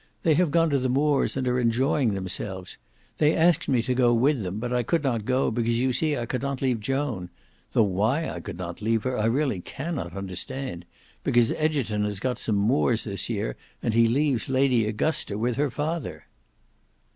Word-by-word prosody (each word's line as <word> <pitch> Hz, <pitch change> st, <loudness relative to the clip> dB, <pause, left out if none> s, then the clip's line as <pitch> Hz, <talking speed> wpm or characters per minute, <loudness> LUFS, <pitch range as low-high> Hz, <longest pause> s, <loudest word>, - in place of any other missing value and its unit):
They 160 Hz, -, +4 dB
have 175 Hz, +2 st, +3 dB
gone 165 Hz, +1 st, +2 dB
to 140 Hz, -, +2 dB
the 130 Hz, 0 st, 0 dB
Moors 140 Hz, +1 st, +1 dB
and 130 Hz, -1 st, -1 dB
are 125 Hz, 0 st, +1 dB
enjoying 120 Hz, 0 st, +2 dB
themselves. 95 Hz, 0 st, -5 dB, 0.4 s
They 150 Hz, +1 st, +4 dB
asked 170 Hz, 0 st, +3 dB
me 125 Hz, -4 st, +2 dB
to 125 Hz, -, 0 dB
go 120 Hz, -1 st, +3 dB
with 135 Hz, +2 st, +2 dB
them, 95 Hz, 0 st, -4 dB
but 120 Hz, +2 st, -3 dB
I 125 Hz, -, +2 dB
could 160 Hz, +7 st, 0 dB
not 120 Hz, -6 st, -1 dB
go, 130 Hz, +1 st, +1 dB
because 115 Hz, 0 st, 0 dB
you 130 Hz, +1 st, +1 dB
see 155 Hz, +2 st, +1 dB
I 120 Hz, -, -2 dB
could 125 Hz, +1 st, -3 dB
not 140 Hz, -1 st, -2 dB
leave 130 Hz, -4 st, 0 dB
Joan; 125 Hz, -6 st, -2 dB, 0.4 s
though 115 Hz, -, +5 dB
why 110 Hz, -, +1 dB
I 90 Hz, -, -5 dB
could 85 Hz, -, -7 dB
not 85 Hz, 0 st, -6 dB
leave 115 Hz, 0 st, +1 dB
her, 130 Hz, 0 st, -1 dB
I 105 Hz, -, 0 dB
really 125 Hz, -2 st, +1 dB
cannot 135 Hz, -, -5 dB
understand, 95 Hz, +2 st, -4 dB, 0.4 s
because 120 Hz, -1 st, +3 dB
Egerton 135 Hz, -10 st, 0 dB
has 105 Hz, -2 st, -2 dB
got 125 Hz, +1 st, -2 dB
some 110 Hz, -, -1 dB
moors 115 Hz, +2 st, +2 dB
this 100 Hz, -4 st, -3 dB
year, -, -, -2 dB, 0.3 s
and 115 Hz, -, 0 dB
he 115 Hz, 0 st, +5 dB
leaves 130 Hz, -1 st, +1 dB
Lady 130 Hz, -4 st, +3 dB
Augusta 110 Hz, 0 st, -1 dB
with 120 Hz, +2 st, 0 dB
her 145 Hz, 0 st, +1 dB
father." 155 Hz, +3 st, -4 dB
125 Hz, 200 wpm, -26 LUFS, 110-140 Hz, 0.4 s, though